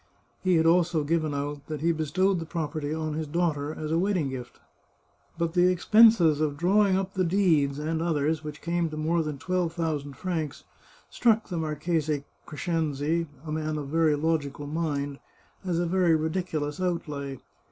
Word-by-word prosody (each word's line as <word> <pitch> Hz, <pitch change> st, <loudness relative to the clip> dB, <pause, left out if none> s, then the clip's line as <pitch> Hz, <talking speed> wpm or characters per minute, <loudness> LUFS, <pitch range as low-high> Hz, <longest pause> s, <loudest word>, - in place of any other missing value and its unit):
He 185 Hz, -1 st, +3 dB
had 160 Hz, 0 st, +3 dB
also 170 Hz, -1 st, +3 dB
given 155 Hz, 0 st, 0 dB
out 145 Hz, 0 st, -4 dB
that 155 Hz, -2 st, -5 dB
he 170 Hz, +1 st, +3 dB
bestowed 175 Hz, +4 st, +1 dB
the 165 Hz, -, -5 dB
prop 160 Hz, -4 st, -3 dB
erty 155 Hz, 0 st, -3 dB
on 155 Hz, -1 st, -2 dB
his 155 Hz, 0 st, -3 dB
daughter 150 Hz, -2 st, 0 dB
as 155 Hz, 0 st, -5 dB
a 165 Hz, -, +2 dB
wedding 180 Hz, -6 st, +1 dB
gift. 125 Hz, -2 st, -8 dB, 0.8 s
But 170 Hz, -1 st, -1 dB
the 180 Hz, 0 st, +4 dB
expenses 180 Hz, -5 st, +5 dB
of 145 Hz, -2 st, 0 dB
drawing 195 Hz, +3 st, +3 dB
up 190 Hz, 0 st, -3 dB
the 185 Hz, -, +1 dB
deeds, 165 Hz, -7 st, +2 dB
and 160 Hz, +2 st, -2 dB
others, 155 Hz, -1 st, 0 dB
which 150 Hz, 0 st, -8 dB
came 170 Hz, 0 st, 0 dB
to 155 Hz, -, -7 dB
more 165 Hz, +2 st, +1 dB
than 150 Hz, -2 st, -4 dB
twelve 180 Hz, +2 st, -1 dB
thousand 155 Hz, -4 st, -2 dB
francs, 160 Hz, -6 st, -3 dB, 0.5 s
struck 225 Hz, -3 st, +2 dB
the 175 Hz, -, -3 dB
Marchese 155 Hz, -1 st, -1 dB, 0.2 s
Crescenzi, 160 Hz, 0 st, -1 dB, 0.2 s
a 155 Hz, -, -5 dB
man 155 Hz, 0 st, -2 dB
of 145 Hz, -2 st, -5 dB
very 160 Hz, -1 st, +3 dB
logical 145 Hz, -2 st, -1 dB
mind, 145 Hz, -2 st, -2 dB, 0.4 s
as 180 Hz, -3 st, -1 dB
a 175 Hz, -, +1 dB
very 175 Hz, -1 st, +3 dB
ridiculous 160 Hz, -1 st, -2 dB
outlay. 150 Hz, -6 st, -3 dB
160 Hz, 175 wpm, -27 LUFS, 150-175 Hz, 0.8 s, expenses